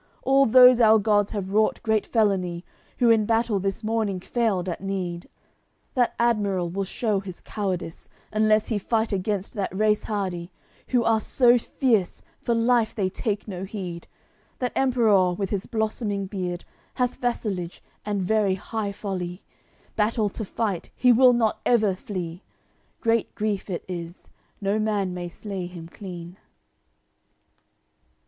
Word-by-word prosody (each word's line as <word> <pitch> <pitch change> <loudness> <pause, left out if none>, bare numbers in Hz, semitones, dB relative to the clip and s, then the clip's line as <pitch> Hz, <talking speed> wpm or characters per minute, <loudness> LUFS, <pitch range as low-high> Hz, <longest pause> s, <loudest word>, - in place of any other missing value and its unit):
All 275 +1 +4
those 250 +1 +8
our 220 -1 +7
gods 205 -1 +2
have 195 -3 -4
wrought 215 +1 +2
great 220 -2 +1
felony, 190 -6 0 0.3
Who 240 -2 +4
in 215 -2 +3
battle 225 -2 +1
this 195 +3 -3
morning 215 -3 -1
failed 200 -3 -1
at 175 - -4
need. 185 -3 -4 0.6
That 245 -2 +1
admiral 200 -7 +1
will 195 +2 -2
shew 210 +1 -1
his 190 -2 -9
cowardice, 185 -5 -4 0.2
Unless 215 0 +3
he 220 -3 0
fight 220 +2 0
against 200 0 -2
that 200 -4 -2
race 215 0 +2
hardy, 185 -4 -3 0.4
Who 245 -2 +2
are 225 -1 +2
so 245 +2 +4
fierce, 225 -6 0 0.2
for 235 - 0
life 230 -1 +2
they 190 -4 0
take 205 +1 -3
no 185 -3 -5
heed. 185 -4 -6 0.5
That 250 -1 -2
Emperour, 220 -9 +3
with 195 0 -3
his 200 -2 -2
blossoming 215 -2 -2
beard, 180 -2 -4 0.3
Hath 250 -1 0
vassalage, 200 -8 -2 0.2
and 205 -2 -1
very 205 0 +2
high 210 +1 -4
folly; 185 -3 -5 0.5
Battle 215 0 +1
to 220 - -5
fight, 200 -3 -3
he 250 0 +4
will 250 +1 +6
not 225 -3 +1
ever 215 -5 +3
flee. 180 -2 -6 0.6
Great 230 -1 +1
grief 210 -2 -2
it 175 - -4
is, 175 -1 -7 0.3
no 200 +2 +1
man 205 -4 0
may 175 -1 -5
slay 190 0 -6
him 175 -2 -9
clean." 175 -1 -9
205 Hz, 145 wpm, -25 LUFS, 185-225 Hz, 0.6 s, those